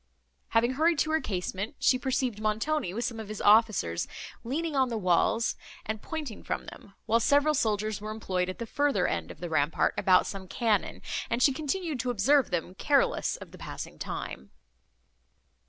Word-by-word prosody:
Having 230 +2 +2
hurried 320 +4 +3
to 310 - +1
her 315 0 +2
casement, 195 +5 -3
she 255 - +3
perceived 255 -5 -1
Montoni, 220 - 0
with 235 +5 -2
some 230 -2 -3
of 220 - -6
his 215 0 -6
officers, 205 - +3 0.4
leaning 305 +6 -2
on 260 -2 +3
the 230 - -2
walls, 190 +4 +2 0.3
and 215 0 -3
pointing 300 -9 -5
from - - -3
them; 195 - -12
while 230 +1 +3
several 290 +5 +3
soldiers 215 -4 0
were 215 - -5
employed 185 -4 -2
at 185 - -5
the 235 - -4
further 275 -5 +1
end 85 -1 -2
of - - -10
the 175 - -3
rampart 155 -1 +1
about 185 -1 +5
some 195 -1 -6
cannon; 215 0 0 0.3
and 235 +2 +1
she 275 - +5
continued 310 0 -2
to 250 - -1
observe 250 +5 +3
them, 175 0 -2
careless - - +2
of - - -11
the - - -13
passing - - -7
time. 65 0 -5
225 Hz, 180 wpm, -29 LUFS, 195-275 Hz, 0.4 s, about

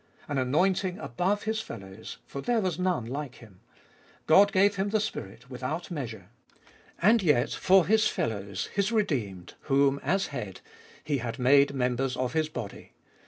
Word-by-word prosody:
An 145 -2 -1
anointing 180 +8 +1
above 180 - -1
His 220 0 -1
fellows, 95 - -9
for 140 - -7
there 240 - +1
was 185 -4 -2
none 180 -10 0
like 135 +2 -5
Him; 105 -6 -16 0.7
God 200 +5 +6
gave 200 +1 +3
Him 195 +1 0
the 215 +1 +1
Spirit 120 - -6
without 135 +8 -5
measure. 115 - -6 0.7
And 220 +5 +4
yet 150 -7 +2
for 190 -1 +4
His 215 0 +3
fellows, 100 - -3
His 200 +2 0
redeemed, 120 - -2
whom, 140 0 +3
as 190 +7 0
Head, 105 -8 -6 0.4
He 145 -3 -1
had 115 -1 -4
made 140 +2 +4
members 125 0 0
of 125 -1 -2
His 155 -1 0
body. 115 -11 -8
140 Hz, 160 wpm, -28 LUFS, 120-190 Hz, 0.7 s, God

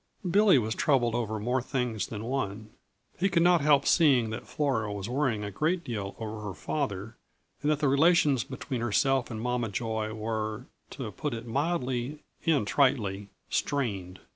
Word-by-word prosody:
Billy 200 -2 +5
was 110 -3 0
troubled 120 -5 +2
over 110 -2 -1
more 125 +4 0
things 120 -5 -2
than 105 -1 -6
one. 110 -4 -3 0.5
He 195 +3 +2
could 170 -2 +3
not 175 -1 +5
help 140 -1 +4
seeing 130 -9 +4
that 110 - -6
Flora 130 -8 -1
was 100 -1 -4
worrying 125 -4 0
a 105 - -4
great 165 - 0
deal 105 -5 -4
over 110 -1 -5
her 105 -3 -5
father, 110 -7 -3 0.4
and 145 - 0
that 155 -1 +1
the 145 - +3
relations 140 -3 +4
between 130 -2 -5
herself 125 +3 +2
and 110 - -5
Mama 125 0 -1
Joy 110 +1 -2
were, 110 -1 -3 0.2
to - - -6
put 145 -5 -3
it 115 +1 -7
mildly 135 0 -2 0.2
and 145 -9 +3
tritely, 105 -6 +1 0.2
strained. 100 -10 -2
120 Hz, 165 wpm, -28 LUFS, 110-140 Hz, 0.5 s, Billy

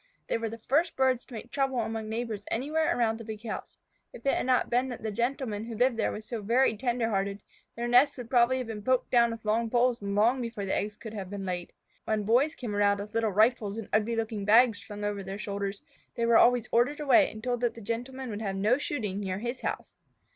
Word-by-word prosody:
They - - 0
were 225 0 -2
the 230 - -7
first 300 +9 +1
birds 260 -2 +2
to 260 - -14
make 220 - -8
trouble 270 -2 0
among 225 -1 -3
neighbors 225 -2 -3
anywhere 300 +4 0
around 225 -2 +1
the - - -7
big 220 +1 -7
house. - - -6 0.4
If 235 - -12
it 275 - +3
had - - -1
not 255 -1 +2
been 250 +2 +2
that 245 - -7
the 220 - -2
Gentleman 235 -1 -2
who 230 -1 -6
lived 250 +1 +3
there 225 - +1
was 215 - -7
so 235 -3 -4
very 230 +3 +3
tender 240 0 0
hearted, 200 0 -2 0.3
their 235 +1 -3
nests 250 +4 +5
would 245 -2 -7
probably 250 0 +3
have 255 - -3
been 220 -2 -6
poked 255 +4 +1
down 235 -1 +5
with 230 -1 -6
poles 235 +2 +1
long 210 +6 +2
before 230 -4 -4
the 190 - -1
eggs 210 +1 -2
could 220 -2 -9
have 195 -4 -6
been 200 -1 -5
laid 180 -1 -2
in - - -13
them. - - -32 0.3
When 215 -1 0
Boys 255 +9 +3
came 225 -5 -5
around 205 0 +3
with 210 +2 -7
little 225 -1 +1
rifles 215 0 +2
and 225 - -6
ugly 220 +2 +2
looking 220 -2 -2
bags 225 +1 +5
slung 210 -1 -8
over 205 -1 -2
their 195 +1 -6
shoulders, 200 -1 -4 0.3
they 235 - 0
were 235 0 +4
always 245 -1 +4
ordered 250 +6 +2
away 280 -4 +5
and 215 0 -10
told 245 -1 -1
that 240 -1 0
the - - -9
Gentleman 245 +4 -4
would 210 +1 -5
have 195 -3 -2
no 215 +7 +2
shooting 210 -10 -3
near 190 -2 -3
his 240 +4 -4
house. - - -4
230 Hz, 245 wpm, -29 LUFS, 210-245 Hz, 0.4 s, nests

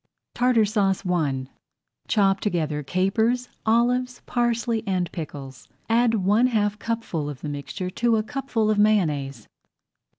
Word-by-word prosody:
TARTAR 245 -3 +3
SAUCE 200 -2 0
I 150 -7 0 0.6
Chop 195 -3 +3
together 160 -7 -1
capers, 220 - 0 0.2
olives, 245 +2 +1
parsley, 235 -2 0
and 185 -2 -1
pickles. 140 -5 -8 0.2
Add 230 0 +3
one 210 +5 +3
half 210 -3 0
cupful 220 -11 -3
of 140 -3 -8
the 150 - -4
mixture 145 +6 -5
to 235 +3 +1
a 215 - 0
cupful 240 -4 -1
of 210 - +1
Mayonnaise. 150 - +1
205 Hz, 130 wpm, -24 LUFS, 165-230 Hz, 0.6 s, TARTAR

